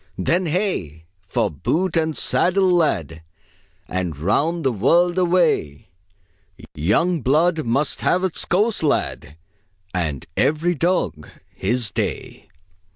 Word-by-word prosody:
"Then 170 - 0
hey! 150 - -2 0.2
for - - 0
boot 165 - -1
and 160 -2 0
saddle, 185 +1 +2
lad, 80 - 0 0.7
And 90 -5 -3
round 150 - 0
the 130 - +2
world 170 - +2
away! 170 - +1 0.8
Young 135 - +1
blood 155 +5 +2
must 135 +6 0
have 180 +1 +1
its 185 -3 0
course, 210 +5 +1
lad, 110 - -1 0.6
And 80 -7 -2
every 160 +4 +1
dog 170 - -1 0.2
his 115 +3 -1
day!" - - -4
155 Hz, 110 wpm, -21 LUFS, -, 0.8 s, saddle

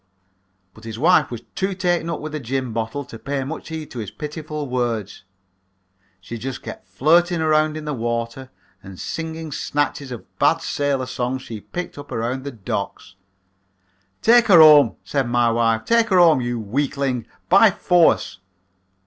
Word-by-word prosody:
"But 110 - -17
his 115 -1 -7
wife 160 +1 +4
was 120 -2 -7
too 190 0 -2
taken 175 -2 0
up 165 - -3
with 155 - -6
the 155 - -4
gin 130 -1 -3
bottle 115 +5 -3
to 115 - -11
pay 140 -1 -3
much 150 +5 -7
heed 160 -2 -6
to 125 - -6
his 105 -4 -5
pitiful 150 +4 -6
words. 120 -6 -3 1.0
She 115 +5 -8
just 130 +2 -6
kept - - -9
flirting 170 +4 +2
around 155 -1 +2
in 155 - -7
the 150 - -2
water 115 +1 -3 0.3
and 95 -1 -11
singing 160 -1 -5
snatches 145 -1 -2
of 120 - -7
bad - - +3
sailor 140 -2 -1
songs 130 +1 -3
she'd 110 -5 -10
picked 175 -4 -5
up 145 - -11
around 120 +3 -2
the 140 - -4
docks. 100 -3 -5 1.1
"'Take 235 +1 +6
her 185 -5 +7
home,' 150 -6 +8
said 135 -4 -1
my 120 -1 +2
wife, 115 -1 +1
'take 230 -1 +3
her 190 - +3
home, 165 -6 +6
you 120 -1 -2
weakling, 130 +1 -2 0.2
by 200 +4 +6
force.' 170 - +2
135 Hz, 165 wpm, -21 LUFS, 120-160 Hz, 1.1 s, home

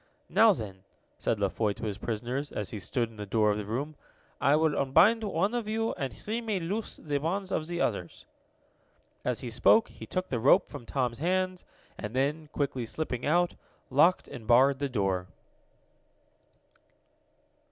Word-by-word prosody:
"Now 225 0 +6
then," 100 - -4 0.4
said 110 - 0
La 100 - +2
Foy 105 +1 0
to - - -11
his 105 -2 -3
prisoners, 120 +7 -3
as 105 - -4
he 105 - -5
stood 115 +4 -1
in 110 - -16
the 105 - -5
door 105 +1 +3
of 105 - -1
the 105 - -4
room, 140 +8 -3 0.5
"I 140 - +5
will 155 -1 +2
unbind 200 - +4
one 195 +1 0
of 240 -3 -2
you, 225 +1 0
and 135 -6 -3
he 225 - -4
may 215 -4 -1
loose 200 +6 -3
the 145 -2 -2
bonds 190 +6 -2
of 155 - -1
the 175 0 -2
others." 90 -6 -2 1.0
As 125 -2 -1
he 125 -3 -5
spoke, 220 - +4
he - - -11
took 185 0 -2
the 125 - -1
rope 130 +5 +5
from 115 - -9
Tom's 125 -3 -1
hands, 185 +2 0 0.3
and 105 +3 -5
then, 150 +4 0
quickly 130 -5 -2
slipping 125 -2 -3
out, 175 +3 +3 0.4
locked 165 +7 +4
and 110 -3 -9
barred 130 +4 +5
the 140 -1 -1
door. 95 -6 0
140 Hz, 175 wpm, -29 LUFS, 115-180 Hz, 1.0 s, Now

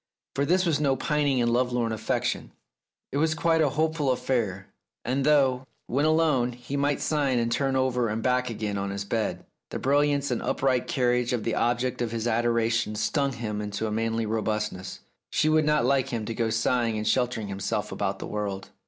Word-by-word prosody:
For 140 - 0
this 185 +2 +3
was 160 -4 +2
no 140 -3 +2
pining 140 -2 +1
and 120 0 +2
lovelorn 125 -2 +1
affection; 110 - -2 0.6
it - - -2
was 160 +1 +2
quite 165 0 +2
a 150 - +3
hopeful 155 -1 0
affair, 110 -7 -1 0.4
and 130 +3 0
though, 130 -3 +3 0.2
when 140 +5 0
alone, 155 -6 +2
he 125 +3 -7
might 140 0 +1
sigh 150 -3 0
and 120 -2 +1
turn 135 +1 +1
over 125 -3 +1
and 110 +1 -2
back 125 0 +1
again 105 -3 -3
on 100 0 -2
his 100 0 -4
bed, 110 +1 -2 0.2
the - - -4
brilliance 140 0 +2
and 120 - -1
upright 130 -2 0
carriage 125 -2 +1
of 120 -3 -1
the 115 - -1
object 120 +1 0
of 120 - 0
his 115 0 -3
adoration 115 -1 +1
stung 140 +5 0
him 110 -3 -4
into 105 +1 -3
a 110 - -2
manly 115 +1 -1
robustness. 105 -3 -2 0.3
She 155 - +2
would 155 0 +3
not 150 -4 +3
like 135 0 +2
him 115 -3 -3
to 115 - -3
go 115 0 0
sighing 115 0 +1
and 105 - -3
sheltering 120 -5 0
himself 100 -1 -2
about - - -2
the - - -6
world. 100 -2 -4
125 Hz, 195 wpm, -26 LUFS, 110-140 Hz, 0.6 s, this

